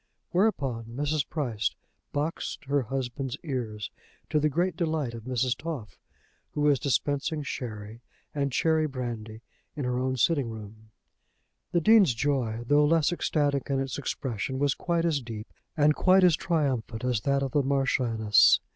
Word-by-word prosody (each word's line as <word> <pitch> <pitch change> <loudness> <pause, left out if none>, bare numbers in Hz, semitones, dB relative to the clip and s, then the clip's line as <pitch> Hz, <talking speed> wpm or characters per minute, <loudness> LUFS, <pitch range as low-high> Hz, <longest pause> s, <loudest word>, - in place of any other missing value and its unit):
Whereupon 140 - +1
Mrs. 145 +5 -2
Price 120 -9 -1 0.4
boxed 150 +1 -3
her 140 +1 +1
husband's 130 +1 -3
ears, 115 -9 -4 0.4
to 155 - +3
the 150 +1 +2
great 175 +4 0
delight 155 -7 -1
of 115 -1 -8
Mrs. 125 0 0
Toff, 125 - -6 0.5
who 150 - -2
was 145 -3 +4
dispensing 145 +2 0
sherry 110 -4 -6 0.3
and 140 -1 -1
cherry 160 +3 +2
brandy 120 -4 -6 0.3
in 145 -4 -3
her 125 0 0
own 130 0 -1
sitting 140 -1 +2
room. 110 0 -10 0.8
The 170 - +2
Dean's 200 - +6
joy, 120 -4 -1
though 145 +4 +4
less 160 +1 +3
ecstatic 145 -5 0
in 135 -1 +1
its 135 +1 -3
expression, 130 -2 -3
was 140 -1 +2
quite 170 -1 -1
as 155 -4 +1
deep 110 -3 -7 0.3
and 150 0 +5
quite 185 +4 +4
as 175 -3 +6
triumphant 130 -10 -1
as 125 -4 0
that 140 +2 +1
of 135 - -2
the 145 - +3
Marchioness. 130 -6 +4
135 Hz, 155 wpm, -28 LUFS, 120-150 Hz, 0.8 s, Dean's